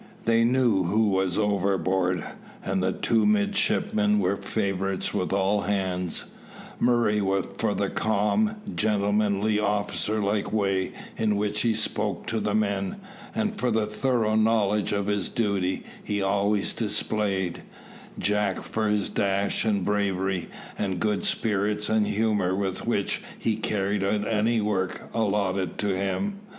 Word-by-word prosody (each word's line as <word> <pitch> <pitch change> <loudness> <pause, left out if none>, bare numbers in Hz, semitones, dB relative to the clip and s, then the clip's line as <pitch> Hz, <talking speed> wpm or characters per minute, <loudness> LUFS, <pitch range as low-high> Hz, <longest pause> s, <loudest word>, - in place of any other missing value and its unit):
They 115 0 +4
knew 120 -6 +3
who 105 +4 +2
was 95 -2 +1
overboard, 95 -3 +1 0.4
and 95 0 0
the 95 0 +1
two 115 +4 +1
midshipmen 210 0 +2
were 100 - +1
favourites 95 -1 -2
with 90 - -1
all 100 +1 +2
hands: 90 -3 -1 0.5
Murray 120 -3 +3 0.4
for - - +1
the - - 0
calm, 110 - +1 0.2
gentlemanly, 105 0 +1
officer 105 +1 0
like 100 0 0
way 95 -3 0 0.2
in 105 -2 +1
which 105 +1 0
he 115 -2 +2
spoke 105 -1 -1
to 115 - -1
the 105 -1 -1
men, 100 -2 0 0.4
and 215 -1 0
for 125 - +1
the 110 -2 +1
thorough 110 0 0
knowledge 110 -2 +2
of 100 -1 0
his 105 -1 -1
duty 100 -5 -1 0.2
he 105 -1 -2
always 100 +1 +1
displayed; 105 -4 -1 0.6
Jack 105 -2 0
for 110 -1 -1
his 105 -1 +1
dash 100 +2 0
and 100 -4 +1
bravery, 95 -3 0 0.3
and 95 -3 -1
good 105 0 0
spirits 105 0 0
and 110 -1 +2
humour 105 -4 +1
with 95 +1 -3
which 100 -4 0 0.2
he 110 - 0
carried 100 -2 -1
out 105 +1 0
any 110 +1 +2
work 95 -3 -2
allotted 100 -4 0
to 100 -2 0
him. 195 - -2
105 Hz, 140 wpm, -26 LUFS, 95-110 Hz, 0.6 s, They